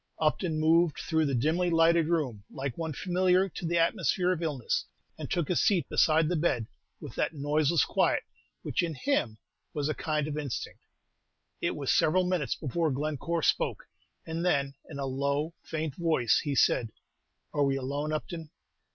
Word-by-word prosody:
Upton 155 +1 0
moved 160 -2 +3
through 160 +2 0
the 140 - 0
dimly 160 +8 +1
lighted 165 -1 +4
room 140 -12 -1
like 135 -3 -4
one 165 -1 -3
familiar 185 +3 +2
to 170 - -5
the 170 +1 +1
atmosphere 180 - +2
of 175 -2 -2
illness, 145 -7 -1 0.3
and - - -7
took 170 -4 0
his 180 - +2
seat 190 -5 +2
beside 155 0 +4
the 175 - 0
bed 150 -8 +1 0.3
with - - -9
that - - -1
noiseless 150 +2 +2
quiet - - +1 0.4
which - - 0
in 165 -3 -2
him 125 - 0 0.4
was 145 0 -1
a - - +1
kind 150 -1 -1
of 150 0 -3
instinct. 140 -5 -5 0.8
It - - 0
was - - -1
several 185 +4 +3
minutes 180 -5 0
before 160 +3 -1
Glencore 155 +4 -2
spoke, - - +1 0.4
and 165 +1 -3
then, 140 -6 +1 0.2
in 145 - -7
a 140 - -2
low, 140 +4 -1
faint 155 -2 -4
voice, 155 -10 +2
he 145 -2 -2
said, 115 -2 +3 0.6
"Are 145 - +2
we 135 -1 +2
alone, 140 +3 -3
Upton?" 160 +1 -4
155 Hz, 170 wpm, -29 LUFS, 140-170 Hz, 0.8 s, lighted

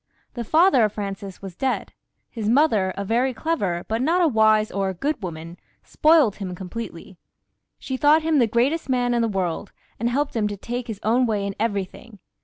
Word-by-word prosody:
The 240 - -4
father 315 - +4
of 210 -1 +1
Francis 195 -2 -6
was 190 -3 -8
dead; 265 +6 -2 0.4
his 220 -3 -3
mother, 225 -8 +3
a 200 - -3
very 245 +4 +1
clever, 205 - -2
but 225 +2 -1
not 330 +7 +2
a 350 - +4
wise 215 -4 +3
or 195 -1 -1
good 290 - -2
woman, 165 -1 -7 0.3
spoilt 305 -9 +3
him 185 -3 -5
completely. 185 -1 -8 0.6
She 265 -1 -5
thought 300 +3 +4
him 315 -2 +2
the 235 - +4
greatest 265 +8 0
man 245 -1 +1
in 235 - +1
the 230 - +1
world, 190 -2 -3 0.3
and 235 +2 0
helped 280 +3 -1
him 215 -2 +1
to 205 -1 -5
take 240 +4 -5
his 220 -4 -6
own 240 +3 +2
way 210 -3 -1
in 200 - -3
everything. 210 +1 -3
225 Hz, 195 wpm, -23 LUFS, 200-260 Hz, 0.6 s, father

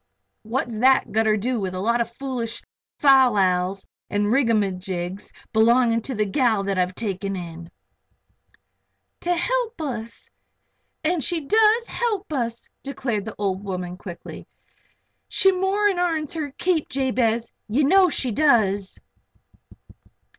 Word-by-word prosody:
"What's 230 0 -3
thet 265 +2 +4
gotter 220 -1 +2
do 240 +3 -1
with 185 -2 -3
a - - -3
lot 235 +4 +1
of 235 0 -3
foolish 240 -3 -5 0.3
fal 265 -4 +6
lals 185 -1 +1 0.2
an' 205 0 0
rigamagigs 195 -6 -1 0.2
belonging 230 +1 +4
to 240 -1 -5
a 210 - +3
gal 220 -1 +1
that 195 -1 -1
I've 180 0 0
taken 195 -2 -3
in 170 -2 -8 0.7
" - - -42
"To 355 0 +1
help 480 +3 -1
us. 235 -7 -5 0.8
And 325 -1 0
she 340 +4 0
does 440 +8 +3
help 420 -8 -2
us," 235 -4 -2
declared 245 -7 -3
the 220 - -7
old 195 -1 -2
woman, 180 -2 -4
quickly. 180 -2 -9 0.8
"She 385 - +4
more'n 385 +1 +1
airns 320 -4 -1
her 310 -3 -3
keep, 345 -4 0
Jabez. 240 -4 0 0.2
Ye 245 +8 +1
know 370 +5 +5
she 260 -5 -1
does." 205 -7 +2
235 Hz, 130 wpm, -23 LUFS, 200-295 Hz, 0.8 s, fal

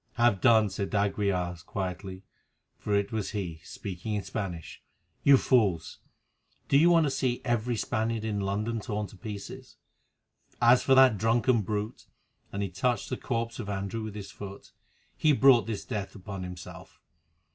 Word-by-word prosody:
"Have 120 -5 +2
done," 110 -5 +5
said 100 - -3
d'Aguilar 100 -3 0
quietly, 95 0 -5 0.5
for 105 - -2
it 100 0 0
was 110 -2 -3
he, 85 -5 -5
speaking 100 +2 -5
in 100 - -2
Spanish. 90 -7 -5 0.4
"You 140 -1 +7
fools! 100 -12 +1 0.7
do - - +2
you 160 +5 +6
want 170 -2 +5
to 145 - +1
see 130 -2 0
every 120 0 0
Spaniard 110 0 -1
in 105 -2 -1
London 105 +4 -1
torn 105 -2 -3
to 105 - -13
pieces? 100 -1 -8 0.8
As 120 +1 +6
for 135 - +4
that 130 -6 +6
drunken 115 +2 +3
brute," 105 +3 -4 0.4
and 100 0 -2
he 100 - -2
touched 115 +5 -1
the - - +1
corpse 115 -1 -3
of 100 - -5
Andrew 100 +2 -3
with 110 -1 -6
his 100 -2 -7
foot, 100 -1 -10 0.4
"he 155 -1 +3
brought 130 -4 +5
his 105 -3 -4
death 100 -5 -4
upon 100 -1 -7
himself. 90 -1 -9
105 Hz, 160 wpm, -28 LUFS, 100-120 Hz, 0.8 s, You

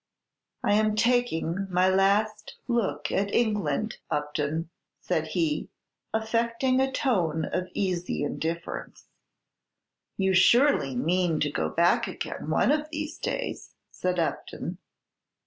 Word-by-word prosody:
"I 205 - +3
am 215 0 +3
taking 215 -6 +1
my 180 0 +3
last 205 +3 +2
look 235 -5 0
at 200 +1 0
England, 210 -4 0
Upton," 150 +3 -2 0.3
said 160 -3 -1
he, 155 -2 -1 0.4
affecting 230 +3 +1
a 265 0 +1
tone 175 - +1
of 185 0 -2
easy 180 -5 -1
indifference. 165 +3 -4 1.1
"You 190 -1 +2
surely 190 - +4
mean 170 +4 +1
to 145 - +1
go - - -1
back 170 +1 +3
again - - -5
one - - +3
of 305 0 0
these 310 0 -5
days?" - - -4 0.2
said 180 0 -2
Upton. 165 -2 -3
190 Hz, 115 wpm, -27 LUFS, 165-230 Hz, 1.1 s, surely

